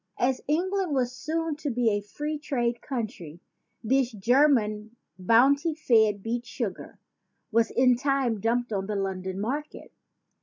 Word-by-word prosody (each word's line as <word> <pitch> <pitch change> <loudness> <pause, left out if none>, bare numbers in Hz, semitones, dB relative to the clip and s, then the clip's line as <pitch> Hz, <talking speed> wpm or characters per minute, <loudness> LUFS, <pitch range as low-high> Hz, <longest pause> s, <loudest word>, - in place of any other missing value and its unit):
As 255 +1 0
Eng 345 +5 +1
land 380 -7 -1
was 250 -2 +1
soon 320 +4 -3
to 300 -1 -3
be 240 -2 +1
a 205 0 0
free 295 +9 -5
trade 240 -5 -2
country, 215 - -5 0.4
this 260 +2 +2
German 220 -1 +2 0.2
bounty 275 - +3
fed 220 -9 +2
beet 235 +1 -3
sugar 225 -9 -5 0.5
was 225 0 +3
in 250 0 +4
time 265 -4 0
dumped 235 +2 0
on 195 -1 -2
the 210 - -2
London 190 -1 -3
market. 280 +8 -4
240 Hz, 145 wpm, -27 LUFS, 215-280 Hz, 0.5 s, in